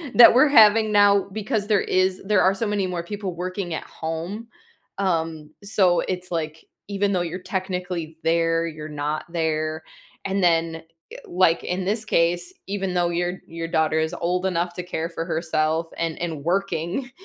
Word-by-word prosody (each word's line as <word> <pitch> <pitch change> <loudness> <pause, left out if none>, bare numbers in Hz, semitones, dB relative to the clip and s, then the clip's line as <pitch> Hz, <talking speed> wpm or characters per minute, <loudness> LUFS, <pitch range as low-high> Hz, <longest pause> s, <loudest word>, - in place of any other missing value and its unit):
that 235 - +10
we're 260 +5 +6
having 220 -3 +6
now 200 -1 +4
because 210 0 -2
there 210 -2 +3
is 185 0 +1
there 205 -1 +3
are 190 - +4
so 220 +3 -2
many 205 -2 0
more 175 -2 -3
people 195 0 -5
working 180 0 -4
at - - -4
home. 170 +8 -5 0.5
Um, 165 -5 -1
so, 190 -3 +3
it's, 180 -1 -4
like, 160 -2 -4 0.2
even 200 0 0
though 180 - +1
you're 175 +1 -4
technically 180 -4 -4
there, 165 0 +2
you're 155 -1 -7
not 150 +1 -3
there. 155 -1 -1 0.4
And 195 -1 0
then, 165 -1 +2 0.4
eh - - -8
like, 175 -2 +2
in 180 +1 -2
this 215 +3 -1
case, 175 -1 +1 0.2
even 195 -2 -2
though 175 -1 +2
your 175 +1 -1
your 165 0 -5
daughter 160 -1 +1
is 160 +2 -1
old 180 +2 0
enough 175 -1 -1
to - - -3
care 165 -2 -3
for 165 - -4
herself, 160 -1 0
and 165 -1 -2
and 160 -4 -4
working 195 - -1
175 Hz, 175 wpm, -23 LUFS, 165-195 Hz, 0.5 s, that